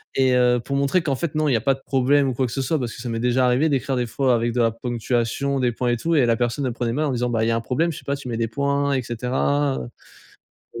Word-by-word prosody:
et 130 -1 +3
heu, 125 0 +3
pour 140 +4 -4
montrer 140 +6 +2
qu'en 140 -4 0
fait 155 +3 -4
non, 155 0 +1
il 140 - +2
y - - +3
a 115 - 0
pas 135 0 +2
de 135 - -18
problème 135 +1 +2
ou - - -2
quoi 130 +2 0
que 120 - -5
ce 135 - -2
soit. 155 +4 0
Parce 120 -3 -4
que - - -9
ça 125 - -6
m'est 115 0 -2
déjà 125 +2 +2
arrivé 125 +6 +2
d'écrire 135 -1 0
des 125 -1 -1
fois 130 +3 +1
avec 115 +1 0
de 120 - +1
la 115 - +3
ponctuation, 120 +3 -2
des 125 -2 +1
points 120 +1 -2
et 120 - +1
tout 165 +8 0
et 140 -5 +4
la 115 -1 +2
personne 120 +4 -1
elle - - 0
le - - -6
prenait 120 -1 -2
mal 150 +4 0
en 145 - 0
disant: 125 0 -1
«Bah, 115 -2 0
il - - 0
y - - +2
a - - +1
un 115 - -1
problème 160 +8 0
je 155 - -8
sais - - -17
pas 140 - -1
tu 140 - -9
mets 115 -2 -3
des 115 - 0
points 140 +3 0
et 130 - +1
cetera» 130 +4 0 1.0
heu, - - -5
125 Hz, 335 wpm, -22 LUFS, 120-140 Hz, 1.0 s, et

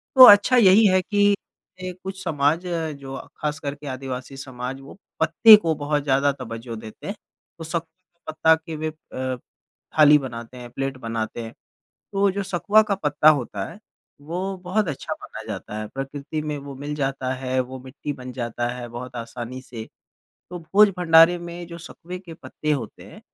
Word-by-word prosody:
तो 260 -1 +12
अच्छा 205 +5 +7
यही 210 -1 +7
है 185 -1 +4
कि 205 +1 +3 0.5
ए 185 0 -4
कुछ 190 0 -6
समाज 155 +1 +1
जो 150 -6 -4 0.2
ख़ासकर 150 -1 -3
के 145 0 -11
आदिवासी 130 0 -6
समाज 130 -1 -6
वो 135 - -13 0.2
पत्ते 165 +8 +8
को 165 -6 -1
बहुत 145 0 -1
ज़्यादा 140 0 +2
तवज्जो 115 -2 -7
देते 110 -1 -10
हैं। 200 - -3 0.4
तो 165 - -8
सकुए 165 +1 -2 0.3
के - - -44
पत्ता 160 +1 +4
के 160 0 -8
वह 155 +1 -2 0.5
अ, - - -12 0.6
थाली 150 0 +8
बनाते 125 -3 -7
हैं, 120 -1 -9
प्लेट 135 +1 -3
बनाते 115 -1 -4
हैं। 115 - -8 0.6
तो 195 - -2
वो 200 0 +4
जो 200 +1 -2
सकुआ 200 +3 +3
का 210 -2 -1
पत्ता 150 -5 +2
होता 120 -9 -1
है 170 - -12 0.4
वो 180 +6 -4
बहुत 190 +2 0
अच्छा 145 - -4
माना - - -10
जाता 105 - -6
है, 110 - -4
प्रकृति 140 +4 -5
में 150 -1 -3
वो 140 0 -9
मिल 145 +2 -5
जाता 135 -2 -2
है, 130 0 -1
वो 130 +1 -5
मिट्टी 130 +3 -6
बन 125 -2 -9
जाता 120 -1 -3
है 120 0 -6
बहुत 125 +2 -8
आसानी 120 +2 -6
से। 115 -3 -8 0.7
तो 180 - -5
भोज-भंडारे 175 -2 +5
में 175 0 -8
जो 170 -1 -8
सकुए 175 +2 -9
के 180 -3 -11
पत्ते 155 -2 -4
होते 120 -7 -4
हैं, - - -13
145 Hz, 185 wpm, -23 LUFS, 130-175 Hz, 0.7 s, तो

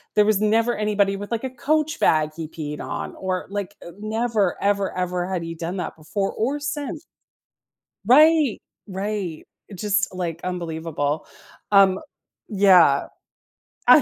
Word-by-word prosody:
there 210 - +5
was 210 -2 +3
never 225 +3 +2
anybody 205 -2 +1
with, 205 +2 -8
like, 230 0 -2
a 260 - -2
Coach 305 +4 0
bag 155 -1 +3
he 165 -1 -5
peed 150 -2 -6
on - - -5
or, 185 -1 -3
like, 205 -1 -4 0.2
never 215 -2 0
ever 200 -2 0
ever 180 -1 -1
had 180 -3 -2
he 165 0 -6
done 170 +3 -4
that 180 - -4
before 165 +6 -3
or 270 +7 -1
since. 290 0 -4 1.0
Right. 300 +2 +5 0.3
Right, 195 -4 -4 0.2
it 195 - -11
just, 205 -1 0
like, 170 -3 -3
unbelievable. 160 -4 -3 0.5
Um, 195 -1 +6 0.5
yeah, 185 - +5 0.8
I - - +9
195 Hz, 140 wpm, -23 LUFS, 175-215 Hz, 1.0 s, I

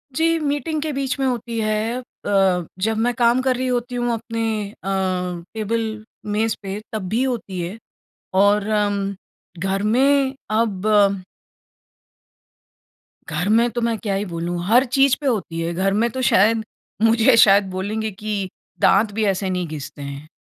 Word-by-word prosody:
जी, 330 +1 +2
meeting 300 +1 -1
के 310 - -2
बीच 270 -1 -2
में 270 - +1
होती 235 -2 -2
है 215 +2 0
अ, - - -17 0.8
जब 220 +3 0
मैं 240 +2 +1
काम 240 +1 +3
कर 260 -1 +1
रही 255 +1 -1
होती 245 0 -1
हूँ 240 0 0
अपने, 230 0 -4 0.4
अ, - - -7 0.7
टेबल 220 0 -2 0.3
मेज़ 220 +1 +1
पे 195 +1 -5
तब 205 -4 -3
भी 235 +4 +1
होती 230 -8 -3
है 180 +6 -5 0.6
और 205 +2 +3
अम्म, 205 -2 0 0.5
घर 195 +1 0
में 270 +4 +3 0.2
अब 205 -2 +2 2.1
घर 190 +3 -1
में 230 +2 +4
तो 240 - -3
मैं 230 -1 0
क्या 205 -3 -2
ही 200 - -1
बोलूँ, 175 -1 -3
हर 245 +6 +5
चीज़ 270 +1 +3
पे - - -6
होती 190 -8 -1
है। 170 +1 -2
घर 195 +3 +1
में 230 +3 +2
तो 260 - -3
शायद 225 -1 +4 0.4
मुझे 230 +2 +5
शायद 200 -1 +7
बोलेंगे 210 +4 -3
कि 200 -1 -4 0.3
दाँत 205 +2 +4
भी 220 +1 0
ऐसे 195 -1 0
नहीं 180 -2 -2
घिसते 150 -1 -7
हैं। 140 +2 -7
220 Hz, 160 wpm, -21 LUFS, 195-240 Hz, 2.1 s, शायद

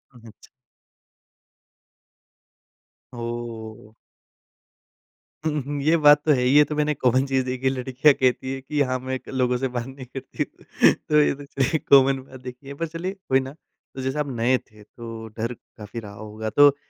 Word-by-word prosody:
ओह! 120 - -15
अच्छा। 110 - -17 2.7
ओह! 115 -2 -6 1.5
हुँ, 150 -2 0
हुँ, 145 0 -3
ये 155 +4 +3
बात 150 -1 +6
तो 155 - +4
है 130 -3 +3
ही। 125 - +3
ये 150 - +9
तो - - -1
मैंने 150 0 +1
कॉमन 130 0 +2
चीज़ 135 -1 0
देखी 130 +1 -4
है, - - +5
लड़कियाँ 130 +3 +3
कहती 130 0 0
हैं 135 - -6
कि, 145 +2 -2
"हाँ, 130 - 0
मैं 130 +1 -3
एक - - -9
लोगों 125 -2 +1
से 130 +1 -1
बात 120 - -2
नहीं 135 -1 -9
करती।" 130 +1 -5 0.5
तो 150 0 +2
ये - - +3
चलिए 140 +3 0
कॉमन 135 -1 +6
बात 130 -1 -13
देखी 125 +2 -10
है, 140 - -6
पर 165 - 0
चलिए 170 +4 -4 0.2
कोई 135 0 +5
ना। 135 +1 -6 0.4
तो 130 - -5
जैसे 130 +3 -2
आप 145 - -1
नए 120 +2 +2
थे, 105 -3 -18
तो 115 0 -9
डर 115 +2 -2 0.2
काफ़ी 105 +2 -7
रहा 105 -2 -9
होगा। 110 +1 -6
तो 145 -1 +8
130 Hz, 180 wpm, -24 LUFS, 120-140 Hz, 2.7 s, ये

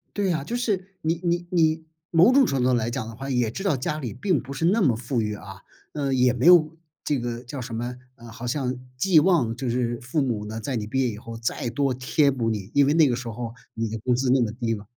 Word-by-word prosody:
对 200 -3 +1
啊， 155 -4 -1
就 230 - -5
是， 200 -6 -1
你 160 +1 +1
你 175 0 0
你 160 -2 +2 0.3
某 175 +9 +6
种 275 0 +6
程 135 - 0
度 - - +2
上 125 - +3
来 120 0 -1
讲 120 -2 -4
的 115 - -8
话， 135 +4 -6
也 125 -4 +1
知 190 - -6
道 190 -8 +2
家 150 +4 -3
里 125 -7 -4
并 150 - 0
不 135 - -8
是 140 +4 -1
那 205 +5 +3
么 130 -9 +4
富 120 +1 -2
裕 105 -1 -2
啊。 95 -2 -11 0.3
呃， 140 -3 -1
也 125 -1 +4
没 125 +3 -1
有 170 -3 +7 0.3
这 145 - 0
个， 120 0 -4
叫 130 +2 -7
什 120 -2 -6
么， 120 +2 -4 0.2
嗯， 120 -2 -13
好 115 +2 -8
像 125 -1 -2 0.2
寄 165 +4 +5
望 150 -10 +2
就 130 +1 -3
是 120 -1 -1
父 125 +5 -1
母 115 -6 -2
呢， 110 +1 -5
在 130 +3 -3
你 105 -2 -3
毕 130 +5 -1
业 125 - +1
以 105 - -7
后， 115 +1 -8
再 115 +1 -2
多 140 +2 0
贴 140 +3 +2
补 120 -4 -1
你。 105 -2 -4
因 140 -1 +5
为 145 - +2
那 160 -3 +5
个 120 - 0
时 125 -1 -6
候， 115 0 -5 0.2
你 115 0 -2
的 110 +1 -4
工 125 +3 0
资 125 +1 +1
那 130 +1 +4
么 110 -2 -1
低 115 -1 -2
了。 105 -1 -9
125 Hz, 290 characters per minute, -25 LUFS, 115-155 Hz, 0.3 s, 有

